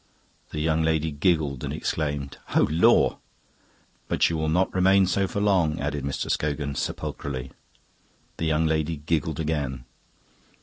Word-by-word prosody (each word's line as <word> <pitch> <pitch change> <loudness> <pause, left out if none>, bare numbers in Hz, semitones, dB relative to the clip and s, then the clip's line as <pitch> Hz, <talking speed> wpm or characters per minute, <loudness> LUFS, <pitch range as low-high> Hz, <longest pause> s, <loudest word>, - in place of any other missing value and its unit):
The 75 - -5
young 80 +1 +1
lady 80 0 +1
giggled 75 -3 0
and - - -3
exclaimed, 70 -3 -3 0.2
"Oh, - - +5
lor'!" 80 +3 +4 0.9
"But - - +2
you - - -1
will 80 0 0
not 90 +4 +1
remain 95 +1 +4
so 95 +2 +1
for 100 - -3
long," 90 -6 +2
added 75 -1 -2
Mr. 70 0 -3
Scogan 75 -1 -1
sepulchrally. 65 -2 -4 0.9
The 80 - -2
young 80 +1 +2
lady 80 0 0
giggled 75 0 -1
again. 70 -6 -2
80 Hz, 140 wpm, -25 LUFS, 70-80 Hz, 0.9 s, Oh